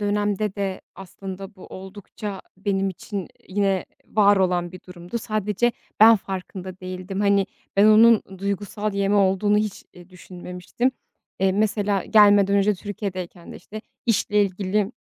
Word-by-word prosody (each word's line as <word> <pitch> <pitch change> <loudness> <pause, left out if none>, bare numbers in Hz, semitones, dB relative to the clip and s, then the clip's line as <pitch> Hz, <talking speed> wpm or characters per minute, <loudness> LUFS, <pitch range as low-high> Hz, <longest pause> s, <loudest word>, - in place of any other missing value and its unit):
dönemde 205 0 0
de 195 -2 -3
aslında 195 +1 -9
bu 185 - -12
oldukça 195 +1 -8 0.2
benim 195 -1 0
için, 190 +2 -7
ııı, 185 - -5 0.2
yine 195 -1 0 0.2
var 205 -1 +4
olan 180 -2 +1
bir 185 - -10
durumdu. 180 +5 -6
Sadece 215 +2 0 0.3
ben 225 +1 +9
farkında 190 -1 -7
değildim. 185 +1 -5
Hani, 200 -1 +3 0.3
ben 200 - +6
onun 220 +1 +7 0.2
duygusal 200 +1 -3
yeme 200 0 +1
olduğunu 200 +1 +3
hiç, 210 -2 -3
eee, 175 0 -15
düşünmemiştim. 180 +6 -4 0.5
Eee, 190 -1 +3
mesela 205 -1 0
gelmeden 205 -2 +5
önce 200 +1 +3
Türkiye'deyken 185 -3 -6
de, - - -9
işte, 215 +4 -9 0.3
işle 210 -2 +2
ilgili 200 +2 -1
200 Hz, 140 wpm, -23 LUFS, 185-210 Hz, 0.5 s, ben